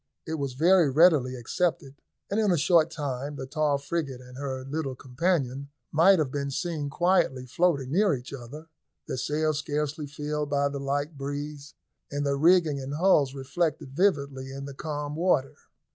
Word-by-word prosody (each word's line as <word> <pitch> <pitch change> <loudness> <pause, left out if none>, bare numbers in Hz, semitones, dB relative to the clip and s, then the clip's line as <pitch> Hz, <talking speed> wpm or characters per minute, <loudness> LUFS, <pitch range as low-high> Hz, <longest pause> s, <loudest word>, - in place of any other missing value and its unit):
It 160 -1 -3
was 140 -2 -2
very 170 +3 +4
readily 145 -4 +4
accepted, 135 +3 -1 0.4
and 205 - +1
in 215 -2 +2
a 175 - +3
short 165 +1 +4
time 145 -2 -4
the 135 - -5
tall 145 +1 +1
frigate 140 -2 -3
and 125 0 -13
her 130 -1 -4
little 135 -1 -3
companion 140 0 -1 0.2
might 180 +5 +6
have 150 -5 0
been 140 0 -2
seen 155 0 -3
quietly 150 -5 +1
floating 140 -2 +1
near 190 -1 +3
each 125 +2 -9
other, 140 +4 -9 0.4
their - - -3
sails 155 +2 0
scarcely 150 0 -3
filled 150 0 -3
by 140 0 +1
the 140 0 -5
light 145 +2 -2
breeze, 145 +1 -5 0.4
and 145 0 -2
their 140 0 +1
rigging 160 -1 +4
and 135 +2 -5
hulls 150 -6 +3
reflected 140 +1 -2
vividly 140 -8 0
in 140 +1 -6
the 140 - -7
calm 150 0 -4
water. 160 -5 +1
145 Hz, 170 wpm, -27 LUFS, 135-160 Hz, 0.4 s, might